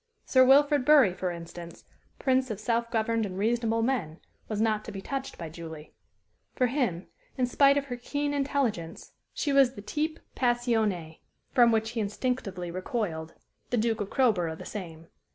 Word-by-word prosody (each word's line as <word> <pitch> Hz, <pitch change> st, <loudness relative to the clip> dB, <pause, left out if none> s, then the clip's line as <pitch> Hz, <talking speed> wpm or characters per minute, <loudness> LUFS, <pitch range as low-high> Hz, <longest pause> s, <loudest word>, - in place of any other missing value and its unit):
Sir 260 Hz, -1 st, +5 dB
Wilfrid 285 Hz, +1 st, +5 dB
Bury, 270 Hz, -9 st, +6 dB
for 185 Hz, 0 st, -2 dB
instance, 170 Hz, 0 st, -9 dB, 0.3 s
prince 260 Hz, -1 st, +1 dB
of 215 Hz, -3 st, -4 dB
self 230 Hz, +1 st, 0 dB
governed 225 Hz, 0 st, 0 dB
and 190 Hz, -3 st, -4 dB
reasonable 225 Hz, +2 st, +1 dB
men, 205 Hz, -11 st, -1 dB, 0.3 s
was 215 Hz, -2 st, -3 dB
not 215 Hz, -1 st, +1 dB
to -, -, -6 dB
be 195 Hz, -, -6 dB
touched 270 Hz, +6 st, -5 dB
by 165 Hz, -, -6 dB
Julie. 160 Hz, -1 st, -9 dB, 0.6 s
For 255 Hz, -, +2 dB
him, 235 Hz, -, -1 dB, 0.3 s
in 255 Hz, -, +2 dB
spite 275 Hz, +3 st, +4 dB
of 280 Hz, -, 0 dB
her 250 Hz, -3 st, -4 dB
keen 285 Hz, +4 st, -2 dB
intelligence, 270 Hz, -, -2 dB, 0.2 s
she 285 Hz, -, -1 dB
was 270 Hz, -2 st, +5 dB
the -, -, -8 dB
type 310 Hz, +7 st, -2 dB, 0.2 s
passionné, 225 Hz, -10 st, 0 dB, 0.3 s
from 240 Hz, -2 st, +5 dB
which 220 Hz, 0 st, +1 dB
he 235 Hz, -, -3 dB
instinctively 200 Hz, -4 st, -2 dB
recoiled 180 Hz, -4 st, -3 dB, 0.3 s
the 245 Hz, -, 0 dB
Duke 225 Hz, 0 st, 0 dB
of 200 Hz, -, -3 dB
Crowborough 190 Hz, -11 st, +1 dB
the -, -, -10 dB
same. 165 Hz, -6 st, -7 dB
225 Hz, 170 wpm, -28 LUFS, 185-260 Hz, 0.6 s, Bury